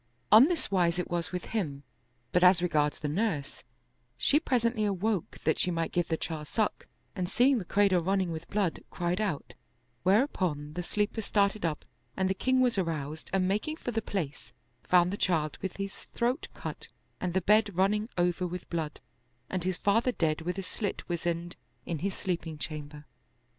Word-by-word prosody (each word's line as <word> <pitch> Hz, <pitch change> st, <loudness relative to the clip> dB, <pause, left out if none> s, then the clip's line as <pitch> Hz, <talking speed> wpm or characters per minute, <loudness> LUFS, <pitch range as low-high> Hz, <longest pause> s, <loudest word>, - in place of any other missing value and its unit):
On 220 Hz, +5 st, +10 dB
this 330 Hz, -, -1 dB
wise 175 Hz, -3 st, +3 dB
it 180 Hz, -, -3 dB
was 170 Hz, -1 st, -1 dB
with 180 Hz, -1 st, -4 dB
him; 150 Hz, -11 st, -3 dB, 0.5 s
but 180 Hz, -, +3 dB
as 180 Hz, -1 st, +7 dB
regards 150 Hz, -4 st, +1 dB
the 150 Hz, -, -3 dB
nurse, 160 Hz, -3 st, -2 dB, 0.5 s
she 295 Hz, -, +4 dB
presently 235 Hz, -7 st, +1 dB
awoke 200 Hz, -1 st, -1 dB
that 155 Hz, -, +2 dB
she -, -, +2 dB
might 165 Hz, -1 st, -1 dB
give 175 Hz, -1 st, 0 dB
the 160 Hz, -, 0 dB
child 155 Hz, -2 st, -4 dB
suck, 215 Hz, +4 st, -1 dB, 0.3 s
and 180 Hz, -3 st, -2 dB
seeing 250 Hz, +4 st, +4 dB
the 190 Hz, -, -6 dB
cradle 195 Hz, -1 st, +3 dB
running 190 Hz, 0 st, +1 dB
with 160 Hz, 0 st, -6 dB
blood, 200 Hz, -5 st, 0 dB
cried 175 Hz, +3 st, -1 dB
out; 190 Hz, -9 st, -2 dB, 0.5 s
whereupon 185 Hz, -, +1 dB
the 180 Hz, -, -3 dB
sleepers 210 Hz, +4 st, -1 dB
started 200 Hz, -1 st, +2 dB
up 155 Hz, -2 st, -4 dB, 0.3 s
and 190 Hz, -1 st, +2 dB
the 190 Hz, -, +2 dB
king 260 Hz, +6 st, +2 dB
was 245 Hz, -5 st, +3 dB
aroused 155 Hz, -3 st, -3 dB
and 190 Hz, -1 st, +2 dB
making 215 Hz, +11 st, 0 dB
for 250 Hz, -, -4 dB
the 225 Hz, -1 st, -1 dB
place, 165 Hz, -11 st, -4 dB, 0.3 s
found 180 Hz, +1 st, +4 dB
the -, -, -2 dB
child 155 Hz, -6 st, 0 dB
with 190 Hz, -, -4 dB
his 195 Hz, 0 st, -6 dB
throat 245 Hz, +2 st, 0 dB
cut -, -, -6 dB, 0.3 s
and 180 Hz, -1 st, -2 dB
the -, -, +5 dB
bed 210 Hz, +4 st, +4 dB
run 190 Hz, +2 st, +4 dB
ning 210 Hz, +2 st, -1 dB
over 180 Hz, +1 st, +1 dB
with 180 Hz, 0 st, -6 dB
blood 160 Hz, -3 st, -3 dB, 0.5 s
and 185 Hz, -2 st, -1 dB
his 185 Hz, 0 st, -1 dB
father 225 Hz, +5 st, +2 dB
dead 160 Hz, -8 st, 0 dB
with 180 Hz, +3 st, -3 dB
a 195 Hz, -, -3 dB
slit 200 Hz, +2 st, -4 dB
weasand 170 Hz, 0 st, -2 dB, 0.3 s
in 165 Hz, -3 st, -3 dB
his 195 Hz, +3 st, -2 dB
sleeping 170 Hz, -4 st, -3 dB
chamber. 150 Hz, -1 st, -6 dB
180 Hz, 185 wpm, -30 LUFS, 165-205 Hz, 0.5 s, On